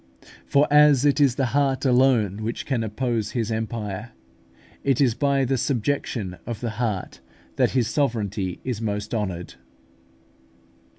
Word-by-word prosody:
For 140 Hz, +1 st, +3 dB
as 150 Hz, -2 st, +6 dB
it 145 Hz, +1 st, +3 dB
is 135 Hz, -4 st, +4 dB
the 135 Hz, -, +1 dB
heart 140 Hz, -1 st, +1 dB
alone 125 Hz, -6 st, +3 dB
which 115 Hz, +2 st, -4 dB
can 125 Hz, -5 st, -1 dB
oppose 110 Hz, -1 st, -2 dB
His 115 Hz, -2 st, -1 dB
empire, 110 Hz, 0 st, -4 dB, 0.7 s
it 135 Hz, -3 st, +1 dB
is 130 Hz, -5 st, +4 dB
by 140 Hz, +1 st, +1 dB
the 130 Hz, 0 st, 0 dB
subjection 120 Hz, -7 st, -2 dB
of 115 Hz, -3 st, -4 dB
the 120 Hz, -2 st, -3 dB
heart 105 Hz, -6 st, -3 dB, 0.4 s
that -, -, +2 dB
His 120 Hz, -3 st, +2 dB
sovereignty 105 Hz, -, -1 dB
is 125 Hz, -4 st, -3 dB
most 105 Hz, 0 st, -3 dB
honoured. 95 Hz, -6 st, -3 dB
120 Hz, 140 wpm, -24 LUFS, 105-135 Hz, 0.7 s, as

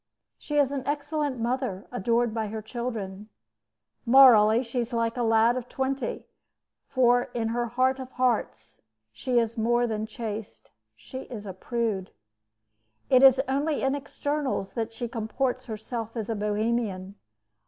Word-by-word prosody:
She 295 Hz, -, -3 dB
is 280 Hz, -2 st, +3 dB
an 280 Hz, -1 st, -2 dB
excellent 290 Hz, -2 st, -2 dB
mother, 235 Hz, -4 st, -2 dB
adored 230 Hz, +3 st, +1 dB
by 220 Hz, -1 st, -2 dB
her 215 Hz, +1 st, -6 dB
children. 220 Hz, -4 st, -5 dB, 0.7 s
Morally, 235 Hz, -3 st, +7 dB
she 245 Hz, +1 st, -3 dB
is 240 Hz, +1 st, -3 dB
like 230 Hz, -1 st, 0 dB
a 245 Hz, -, -2 dB
lad 225 Hz, +1 st, +4 dB
of 250 Hz, -1 st, -5 dB
twenty; 265 Hz, -2 st, -3 dB, 0.6 s
for 245 Hz, -1 st, +3 dB
in 225 Hz, -2 st, 0 dB
her 240 Hz, +1 st, -1 dB
heart 255 Hz, +3 st, +1 dB
of 260 Hz, -1 st, -7 dB
hearts, 220 Hz, -, -1 dB, 0.3 s
she 245 Hz, -, -1 dB
is 230 Hz, 0 st, +1 dB
more 240 Hz, +2 st, +2 dB
than 220 Hz, -2 st, -2 dB
chaste 215 Hz, -, -7 dB, 0.2 s
she 185 Hz, -, -9 dB
is 215 Hz, -5 st, -8 dB
a 190 Hz, -, -6 dB
prude. 215 Hz, -1 st, -2 dB, 1.0 s
It 255 Hz, -1 st, +7 dB
is 265 Hz, -1 st, +8 dB
only 285 Hz, +3 st, 0 dB
in 270 Hz, 0 st, +2 dB
externals 285 Hz, -5 st, -3 dB
that 230 Hz, -1 st, -3 dB
she 235 Hz, +1 st, -4 dB
comports 245 Hz, +3 st, -2 dB
herself 225 Hz, +1 st, -5 dB
as 225 Hz, 0 st, -3 dB
a -, -, -1 dB
Bohemian. 210 Hz, -2 st, -1 dB
235 Hz, 150 wpm, -27 LUFS, 220-255 Hz, 1.0 s, is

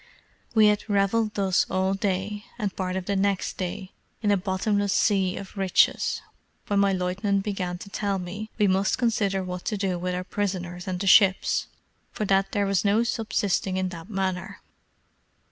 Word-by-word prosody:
We 220 Hz, -1 st, +7 dB
had 210 Hz, +1 st, +2 dB
revelled 210 Hz, +2 st, +1 dB
thus 190 Hz, -3 st, +2 dB
all 190 Hz, +1 st, +1 dB
day, 200 Hz, +2 st, -2 dB
and 205 Hz, -5 st, -3 dB
part 185 Hz, -1 st, -2 dB
of 190 Hz, -1 st, -3 dB
the 200 Hz, -, -1 dB
next 195 Hz, 0 st, 0 dB
day, 185 Hz, 0 st, -4 dB, 0.3 s
in 205 Hz, -, +3 dB
a -, -, +5 dB
bottomless 200 Hz, +1 st, 0 dB
sea 195 Hz, -3 st, +2 dB
of 195 Hz, -, -9 dB
riches, 195 Hz, -2 st, +2 dB, 0.4 s
when 205 Hz, -1 st, +1 dB
my 200 Hz, 0 st, +4 dB
lieutenant 195 Hz, +2 st, 0 dB
began 185 Hz, -4 st, -3 dB
to 200 Hz, -, -10 dB
tell 200 Hz, -1 st, -1 dB
me, 195 Hz, +4 st, -6 dB
we 210 Hz, -, +3 dB
must 190 Hz, +1 st, +2 dB
consider 205 Hz, -5 st, +1 dB
what 180 Hz, -1 st, -5 dB
to 215 Hz, -, -1 dB
do 190 Hz, -3 st, -1 dB
with 180 Hz, +1 st, -2 dB
our 180 Hz, -, -3 dB
prisoners 180 Hz, -2 st, -3 dB
and 185 Hz, -1 st, -2 dB
the 200 Hz, -, -3 dB
ships, 190 Hz, 0 st, +4 dB, 0.4 s
for 215 Hz, -, -3 dB
that 195 Hz, 0 st, +2 dB
there 205 Hz, -1 st, +1 dB
was 195 Hz, -2 st, +1 dB
no 210 Hz, +3 st, +3 dB
subsisting 205 Hz, -5 st, -1 dB
in 185 Hz, 0 st, 0 dB
that 170 Hz, +1 st, -9 dB
manner. 190 Hz, -2 st, -3 dB
195 Hz, 180 wpm, -26 LUFS, 185-205 Hz, 0.4 s, We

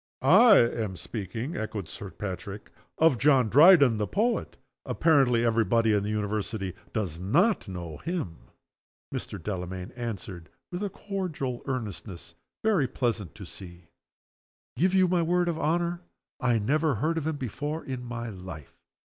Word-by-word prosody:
_" -, -, 0 dB
"I 235 Hz, -5 st, +8 dB
am 115 Hz, -4 st, +1 dB
speaking," 115 Hz, -, -5 dB
echoed 110 Hz, -4 st, -4 dB
Sir 95 Hz, +6 st, -8 dB
Patrick, 95 Hz, +1 st, -7 dB, 0.3 s
"of 160 Hz, -7 st, +4 dB
John 135 Hz, -5 st, +4 dB
Dryden 145 Hz, -, +7 dB
the 105 Hz, -, 0 dB
Poet. 230 Hz, +4 st, -1 dB, 0.3 s
Apparently, 130 Hz, -7 st, +3 dB
every 115 Hz, -1 st, +3 dB
body 115 Hz, -1 st, +2 dB
in 105 Hz, -, +2 dB
the 100 Hz, -, -3 dB
University 105 Hz, -2 st, -2 dB, 0.2 s
does 95 Hz, -8 st, -3 dB
not 165 Hz, -, +2 dB
know 85 Hz, -5 st, -6 dB
him!" 165 Hz, -, -4 dB, 0.8 s
Mr. -, -, -4 dB
Delamayn 90 Hz, 0 st, -5 dB
answered, 100 Hz, -8 st, -6 dB, 0.2 s
with 175 Hz, +2 st, -4 dB
a 205 Hz, -, -1 dB
cordial 180 Hz, -11 st, -4 dB
earnestness 105 Hz, -8 st, -5 dB, 0.3 s
very 205 Hz, -11 st, +3 dB
pleasant 115 Hz, -, -2 dB
to 105 Hz, -2 st, -9 dB
see: 85 Hz, -1 st, -11 dB, 0.9 s
"Give 185 Hz, +8 st, +2 dB
you 185 Hz, -1 st, +5 dB
my 175 Hz, -1 st, +2 dB
word 175 Hz, +1 st, +1 dB
of 165 Hz, -2 st, -1 dB
honor, 170 Hz, +2 st, 0 dB, 0.4 s
I 120 Hz, -2 st, +2 dB
never 145 Hz, +6 st, +1 dB
heard 160 Hz, +9 st, 0 dB
of 155 Hz, -, -4 dB
him 160 Hz, -2 st, -1 dB
before 145 Hz, +5 st, -4 dB
in 130 Hz, -2 st, -5 dB
my 120 Hz, -1 st, -5 dB
life! 90 Hz, -6 st, -9 dB
120 Hz, 150 wpm, -27 LUFS, 100-160 Hz, 0.9 s, I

